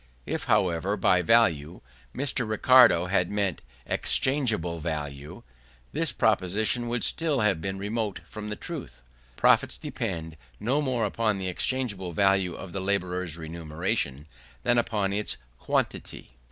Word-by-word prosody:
If, - - -3
however, 90 +3 +1
by 90 -2 +3
value, 85 -6 +2 0.3
Mr. 130 -4 -1
Ricardo 110 -5 +6
had 90 -1 +1
meant 100 -4 -1 0.2
exchangeable 110 - +1
value, 75 -3 -5 0.5
his 160 -2 0
proposition 110 +2 +1
would 120 0 -1
still 155 -6 0
have 100 -7 +2
been 95 +2 -3
remote 105 +1 -3
from 105 0 -7
the 105 - -3
truth. - - -8 0.3
Profits - - +3
depend 80 -1 -5 0.2
no 130 +8 +1
more 130 -5 0
upon 110 0 0
the 95 -1 -4
exchangeable 100 -3 -2
value 95 -1 +2
of 95 - -8
the 95 - -4
labourer's 90 -3 -1
remuneration, 80 - -3 0.4
than 120 0 +3
upon 105 -4 -1
its 105 +1 0 0.2
quantity. - - -2
100 Hz, 130 wpm, -27 LUFS, 85-115 Hz, 0.5 s, Ricardo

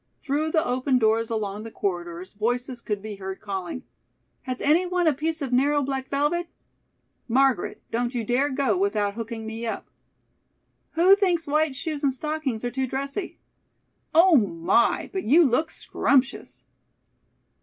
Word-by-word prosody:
Through 295 +2 0
the 315 +1 +1
open 255 +1 +1
doors 225 -1 +2
along 210 -2 -3
the 225 - -7
corridors 175 -3 -4
voices 245 +4 -2
could 210 -3 -3
be 215 -2 -6
heard 190 0 -6
calling: 195 +3 -5 0.7
"Has 255 - -2
anyone 355 +4 +2
a 315 - +4
piece 315 +2 -2
of 260 -2 -3
narrow 285 +3 +3
black 265 -1 -3
velvet?" 295 +5 0 0.8
"Margaret, 260 -4 +1
don't 240 +2 -1
you 235 - -1
dare 250 +6 +1
go 265 -6 +1
without 200 +2 0
hooking 225 0 -6
me 225 +1 -5
up!" 225 - -5 1.0
"Who 360 +4 +6
thinks 360 -5 +1
white 305 -1 +1
shoes 300 +1 -4
and 275 - +3
stockings 270 -4 -3
are 245 - -2
too 265 +1 -1
dressy?" 275 +9 -4 0.7
"Oh 340 +1 +6
my, 195 +1 +1
but 380 - -2
you 315 +9 +6
look 310 +4 +2
scrumptious!" 270 -4 -1
255 Hz, 150 wpm, -25 LUFS, 220-300 Hz, 1.0 s, Who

